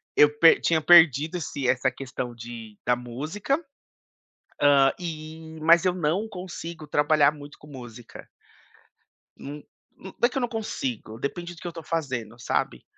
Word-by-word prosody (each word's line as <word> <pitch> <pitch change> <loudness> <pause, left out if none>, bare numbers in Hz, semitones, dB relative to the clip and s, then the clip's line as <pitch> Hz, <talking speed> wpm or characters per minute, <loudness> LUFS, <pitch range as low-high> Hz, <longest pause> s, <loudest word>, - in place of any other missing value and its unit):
eu 150 - +7
per 165 - +7
tinha 160 -2 +1
perdido 160 0 +6
esse 140 -5 -4
essa 130 +1 +2
questão 125 -2 -6
de 115 -2 -10
da 125 - +3
música, 150 - -3 1.0
hã, 140 -1 +5
e 160 -1 -7
mas 170 +3 +5
eu 180 - +3
não 180 +5 -1
consigo 170 -5 -8
trabalhar 145 0 +3
muito 145 -1 -12
com 150 - -16
música. 120 -4 -11 1.1
Hum, 145 +1 -8 0.4
nã 190 - -11
não - - -37
é 240 - +6
que 265 - -6
eu - - 0
não 245 - 0
consigo, 130 - -5
depende 175 +5 -5
do - - -15
que - - -6
eu 170 - -6
tô 165 -1 -8
fazendo, 130 -8 -4
sabe. - - -2
150 Hz, 160 wpm, -25 LUFS, 130-170 Hz, 1.1 s, eu